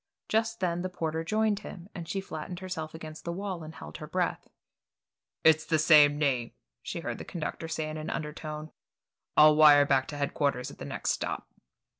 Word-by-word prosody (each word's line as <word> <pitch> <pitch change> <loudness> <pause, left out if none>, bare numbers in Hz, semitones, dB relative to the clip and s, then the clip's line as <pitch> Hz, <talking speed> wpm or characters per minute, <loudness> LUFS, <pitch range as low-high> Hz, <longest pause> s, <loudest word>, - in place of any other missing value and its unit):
Just 225 0 0
then 175 -1 0
the 185 - -2
porter 160 -2 -2
joined 215 +3 +1
him, 185 -4 -9
and 170 -3 -7
she 195 - -1
flattened 175 -1 -6
herself 170 -4 -5
against 155 -1 -9
the 170 - -3
wall 190 -1 -4
and 155 0 -9
held 75 0 -9
her - - -8
breath. - - -1 1.0
"It's 160 0 +6
the 160 0 +1
same 150 -2 +6
name," 130 -6 0 0.3
she - - -5
heard - - -4
the - - -5
conductor 165 -1 -5
say 160 -1 -2
in 155 0 -5
an 155 - -5
undertone. 155 0 -5 0.7
"I'll 150 0 +8
wire 150 -2 +8
back 135 -2 +2
to 145 - -6
headquarters 140 -3 -1
at - - -14
the - - -6
next - - -1
stop." - - -3
155 Hz, 190 wpm, -29 LUFS, 150-175 Hz, 1.0 s, I'll